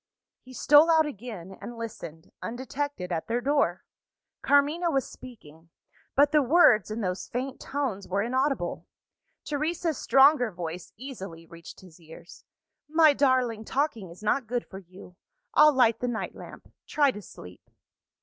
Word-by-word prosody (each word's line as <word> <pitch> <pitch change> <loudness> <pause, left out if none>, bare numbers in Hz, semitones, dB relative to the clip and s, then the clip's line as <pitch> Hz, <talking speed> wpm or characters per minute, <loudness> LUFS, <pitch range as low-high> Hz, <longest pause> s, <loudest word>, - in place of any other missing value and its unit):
He 255 - -15
stole 295 +5 +5
out 320 -1 +4
again, 210 - -8
and 240 - -8
listened, 180 -8 -9
undetected, 255 -4 -5
at 165 -2 -3
their 235 +2 0
door. 265 -9 0 0.6
Carmina 295 +5 +2
was 270 -4 0
speaking; 165 -10 -14 0.5
but 285 +1 +4
the 305 -1 +4
words, 255 - +4
in 215 +2 -4
those 185 -2 -3
faint 260 +2 -5
tones, 265 -9 -4
were 200 +2 -1
inaudible. 260 -5 -2 0.6
Teresa's 315 +2 -2
stronger 270 -2 +4
voice 175 -1 -7
easily 195 -10 -9
reached 170 0 -13
his 180 -3 -17
ears. 170 +1 -14 0.5
"My 315 -1 +5
darling, 255 -5 +1
talking 235 - -2
is 175 +5 -14
not 230 +3 0
good 245 +1 -2
for 190 - -10
you. 180 -1 -15 0.4
I'll 305 - +7
light 245 -5 +3
the 245 - -2
night 235 -2 -4
lamp - - -13
try 285 -2 +2
to 210 - -9
sleep." 90 - -14
240 Hz, 150 wpm, -27 LUFS, 185-285 Hz, 0.6 s, I'll